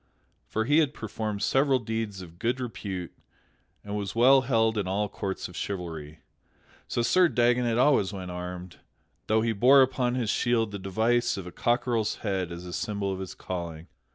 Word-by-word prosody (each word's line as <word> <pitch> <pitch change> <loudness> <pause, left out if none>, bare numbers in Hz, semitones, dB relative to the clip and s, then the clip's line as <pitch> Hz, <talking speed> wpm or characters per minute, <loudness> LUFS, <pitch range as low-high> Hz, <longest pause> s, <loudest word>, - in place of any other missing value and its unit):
For 110 0 -1
he 145 +5 +4
had 150 -3 +1
performed 110 -1 -4
several 135 0 +3
deeds 110 -4 -4
of 85 -1 -14
good 120 +4 0
repute 95 -7 -5 0.7
and 105 0 -5
was 100 -1 -4
well 130 +3 +6
held 115 -3 +2
in 105 -3 -1
all 100 +2 0
courts 95 -1 -4
of 90 - -13
chivalry. 80 -6 -5 0.7
So 120 - -1
Sir 180 +8 +5
Dagonet 120 -2 +2
always 125 -7 +3
went 95 -3 -6
armed; 90 0 -7 0.5
though 110 0 +3
he 115 -1 +1
bore 130 +6 +6
upon 125 -1 0
his 115 -5 0
shield 115 -3 +1
the 100 - -5
device 115 +5 +1
of 95 - -6
a 90 - -8
cockerel's 120 0 0
head 95 -4 -1
as 85 +1 -7
a 90 - -7
symbol 100 -2 -2
of 95 - -5
his 95 -1 -6
calling. 85 -2 -6
105 Hz, 180 wpm, -27 LUFS, 95-120 Hz, 0.7 s, well